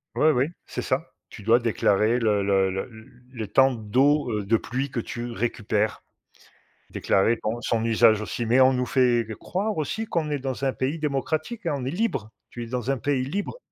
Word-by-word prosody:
Oui, 155 - +4
oui, 130 0 +2 0.2
c'est - - -5
ça. - - -2 0.2
Tu 105 - -11
dois 115 +3 +5
déclarer 110 0 +2
le 105 -3 +2
le 95 -1 +2
le 95 +5 -4 0.4
le 115 -4 -5
temps 135 +6 +4
d'eau, 125 +5 +2
heu, 105 -1 -1
de 115 +2 +3
pluie 130 +5 -3
que 120 - -3
tu 120 +1 -5
récupères. 110 -2 -1 0.9
Déclarer 110 +4 +2
ton 115 +2 -2
son 115 -1 0
usage 110 -1 +4
aussi, 115 +2 -3
mais 120 +4 +3
on 130 0 +6
nous 125 0 0
fait 120 -3 +3
croire 205 +3 -2
aussi 220 +9 -2
qu'on 160 -7 -2
est 145 - -1
dans 135 0 -3
un 135 - +1
pays 135 +5 -2
démocratique 155 - -2
hein, 150 - +1
on 125 - -5
est 130 - -2
libre! 150 - -2 0.2
Tu 120 - -7
es - - -7
dans 125 +1 -3
un 135 - 0
pays 130 +1 0
libre, 200 - -4
125 Hz, 200 wpm, -25 LUFS, 110-140 Hz, 0.9 s, on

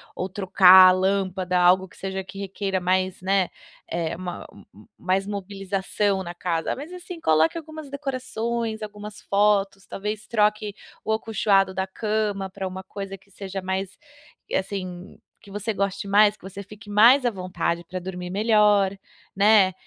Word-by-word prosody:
ou 185 - -3
trocar 185 -1 +7
a - - +6
lâmpada, 185 -1 0
algo 185 +2 +4
que - - -20
seja 190 0 -4
que 190 - -12
requeira 195 -1 -3
mais, 185 +1 0
né, 190 -1 +1 0.4
é 165 -1 -2
uma 180 -1 -6 0.5
mais 190 +2 0
mobilização 195 0 -2
na 175 -1 -7
casa, 170 -2 -2
mas 295 +6 -8
assim 360 -1 -8
coloque 160 - +3
algumas 315 -2 -8
decorações, 235 -5 -3
algumas 210 0 -8
fotos, 200 -1 +1
talvez 210 +1 -5
troque 210 -1 +1 0.3
o 220 - 0
acolchoado 200 -3 +1
da 190 +1 -2
cama 210 -1 -2
pra 190 0 -5
uma 185 0 -7
coisa 195 0 -7
que 195 +1 -28
seja 195 0 -6
mais, 190 +1 -3 0.6
assim, 185 -2 -4 0.2
que 200 - -15
você 210 +2 -3
goste 200 0 -2
mais 210 +1 +4
que - - -34
você 195 +1 -8
fique 210 +1 -14
mais 235 +6 +6
à - - +4
vontade 180 -3 -3
para 185 +2 -5
dormir 180 0 -6
melhor, 205 -1 +3 0.4
né, 200 -1 +5
195 Hz, 155 wpm, -24 LUFS, 185-210 Hz, 0.6 s, trocar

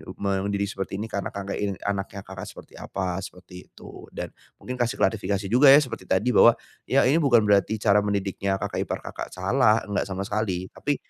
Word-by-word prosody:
eee, 100 -1 -3
mendidik 100 +1 -1
seperti 95 0 -5
ini 105 - -4
karena 100 -3 -4
Kakak 100 0 -6
ingin 100 -2 -2
anaknya 100 0 -3
Kakak 95 0 -8
seperti - - -13
apa 95 -1 -3
seperti 90 -1 -11
itu. - - -13
Dan - - -7 0.2
mungkin 125 0 -7
kasih 120 0 0
klarifikasi 100 -2 0
juga 135 +4 +6
ya, 135 - +10
seperti 130 -10 -1
tadi 115 +7 +1
bahwa 120 - +6 0.3
ya 135 - +4
ini 145 +6 +3
bukan 120 -7 +4
berarti 105 +1 +3
cara 105 -1 +3
mendidiknya 100 -1 -1
kakak - - -3
ipar - - -4
Kakak - - -6
salah, 110 +4 +2
enggak 100 -1 -2
sama 95 +1 -4
sekali, 100 -3 -3
tapi 145 -1 -2
100 Hz, 195 wpm, -25 LUFS, 95-115 Hz, 0.3 s, ya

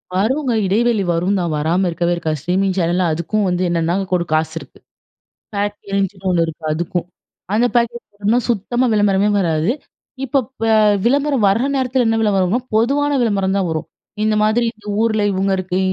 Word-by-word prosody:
வருங்க. 255 +8 +1
இடைவெளை 220 +2 +2
வருந்தான். 175 0 0
வராம 170 +5 +1
இருக்கவே 170 +1 0
இருக்காது, 160 -2 -2
ஸ்ட்ரீமிங் 185 +3 0
சேனல்ல, 175 +1 +1
அதுக்கும் 190 +6 -1
வந்து 180 0 0
என்னென்னா 170 0 0 0.2
கொரு 175 -1 +2
காசு 155 0 +1
இருக்கு. - - -15 0.8
பேக்கேஜ்ன்னு 200 -1 -2
ஒண்ணு 170 -2 +2
இருக்கு, 160 0 -8
அதுக்கும். 175 +2 -2 0.5
அந்த 225 +3 +3
பேக்கேஜ் 235 0 +1 0.2
போனா 230 +4 +4
சுத்தமா 240 +3 0
விளம்பரமே 205 -1 +2
வராது. 165 +1 +1 0.5
இப்பப் 265 -1 0 0.2
அ - - +5 0.3
விளம்பரம் 275 -1 +2
வர்ர 215 +6 +2
நேரத்துல 255 -1 +1
என்ன 225 0 +2
விளம்பரம்னா? 200 0 +2 0.2
பொதுவான 280 +6 +2
விளம்பரம் 195 -4 +1
தான் 190 -2 0
வரும். 155 -1 -3 0.4
இந்த 215 0 +2
மாதிரி, 220 +3 +2
இந்த 210 -1 -17
ஊருல 220 -2 +1
இவங்க 195 +1 0
இருக்கு 185 -1 -2
195 Hz, 155 wpm, -18 LUFS, 175-230 Hz, 0.8 s, அ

